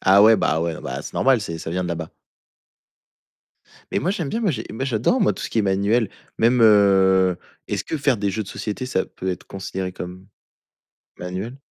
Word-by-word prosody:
Ah 100 +2 +6
ouais, 110 +1 +7
bah 80 -4 +1
ouais, 85 -1 -2
bah, - - -5
c'est - - -9
normal, 130 -3 +3
c'est 85 -5 -5
ça 80 - -6
vient 90 +1 -1
de 90 - -3
là-bas. 80 -2 -4 1.8
Mais - - +2
moi 180 - 0
j'aime 170 -8 -2
bien, 230 - -2
moi 210 -5 +2
j'ai 145 - -4
moi 120 +4 -3
j'adore, 130 - +1
moi, 200 - +3
tout - - -8
ce - - -3
qui 115 - -2
est - - +1
manuel, 100 +3 +1 0.3
même, 120 +2 +3
heu, 95 -4 +5 0.3
est-ce - - -2
que 160 - -3
faire 135 -4 +1
des 100 0 0
jeux 110 +3 -2
de 95 - -11
société, 105 +4 -4
ça 125 -7 -1
peut 95 - -6
être 90 - -6
considéré 95 -1 -5
comme 90 +2 -8 0.9
manuel? 95 +8 -5
100 Hz, 210 wpm, -22 LUFS, 95-120 Hz, 1.8 s, ouais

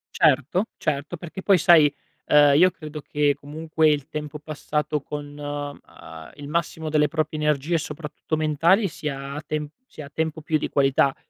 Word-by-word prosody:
Certo, 155 - +3
certo. 150 +3 -2
Perché 175 +3 -8
poi, 195 -2 +5
sai, 155 -3 +6 0.3
ehm, 145 -1 +6
io 185 +2 +6
credo 155 -3 -8
che, 145 -1 +1
comunque, 155 +2 0
il 145 -1 0
tempo 150 -1 -6
passato 150 -1 -2
con, 145 0 -7
ehm, 145 0 -5 0.6
il 145 -1 -9
massimo 160 0 -2
delle 150 -1 +3
proprie 155 0 -2
energie, 150 +2 +1
soprattutto 150 +1 -5
mentali, 165 +7 +3
sia 140 -2 -5
tem 150 -1 -3 0.2
sia 145 - -10
tempo 160 -1 -2
più 155 0 0
di - - -3
qualità, 135 0 +3
150 Hz, 155 wpm, -24 LUFS, 145-160 Hz, 0.6 s, sai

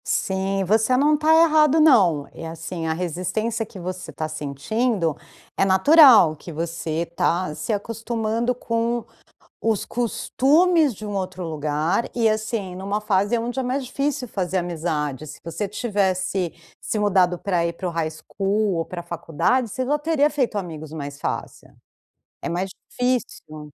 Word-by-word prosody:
Sim, 195 0 0
você 220 +6 +3
não 295 +3 +4
está 305 +1 +2
errado 310 -1 +4
não. 190 - +5
E - - -9
assim, 165 +1 -5
a 160 - +1
resistência 185 +7 -2
que 205 -2 -12
você 185 +1 -6
está 155 - -4
sentindo, 160 - -1 0.4
é - - +2
natural, 195 - +7
que 170 - -10
você 165 0 -3
está 170 0 0
se 190 - -4
acostumando 225 +2 -2
com 230 0 -1 0.6
os 225 -3 0
costumes 295 +6 +2
de 215 +1 -9
um 205 -1 -4
outro 185 -1 -4
lugar, 155 +5 -1
e 230 -2 +3
assim, 215 -3 -2
numa 200 +3 -3
fase 205 +1 +1
aonde 240 +3 -2
é - - -1
mais 255 +2 -2
difícil 275 +1 -2
fazer 190 -3 -2
amizade. 155 -5 -2
Se 150 - -10
você 170 +5 -3
tivesse 190 -4 -1 0.3
se - - -3
mudado 185 -4 +3
para 175 -4 0
ir 170 - -1
para 180 +2 -5
o - - -2
high 165 -1 -1
school 195 +5 -1
ou 165 -1 -1
para 175 -1 -7
faculdade, 170 - 0
você 255 +5 -3
já 295 +3 +1
teria 300 -1 +2
feito 260 -8 -1
amigos 160 -5 -6
mais 145 -2 -6
fácil. - - -5 0.7
É - - -4
mais 180 +3 -2 0.2
difícil. 245 -11 -2
195 Hz, 155 wpm, -23 LUFS, 170-235 Hz, 0.7 s, natural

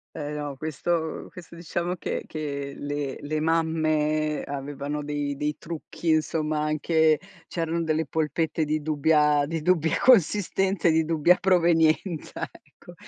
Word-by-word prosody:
Eh, 150 -1 -4
no 145 -2 -5
questo 160 +2 -2
questo 175 -1 -12
diciamo 175 +1 -3
che - - -4
che 140 -3 -4
le 145 -2 -3
le 155 +1 -2
mamme 155 -1 +1
avevano 145 +1 -4
dei 145 -1 -2
dei 150 0 -1
trucchi, 165 +1 -6
insomma, 155 -1 +1
anche 155 +1 +2 0.3
c'erano 165 0 -2
delle 160 0 0
polpette 160 +1 -1
di 155 +1 -1
dubbia 150 -1 +3
di 165 +2 -3
dubbia 165 -1 +2
consistenza 195 -4 +3
e - - +5
di 160 0 +2
dubbia 165 +2 +4
provenienza 170 -2 +2
ecco, - - -17
155 Hz, 135 wpm, -26 LUFS, 150-165 Hz, 0.3 s, e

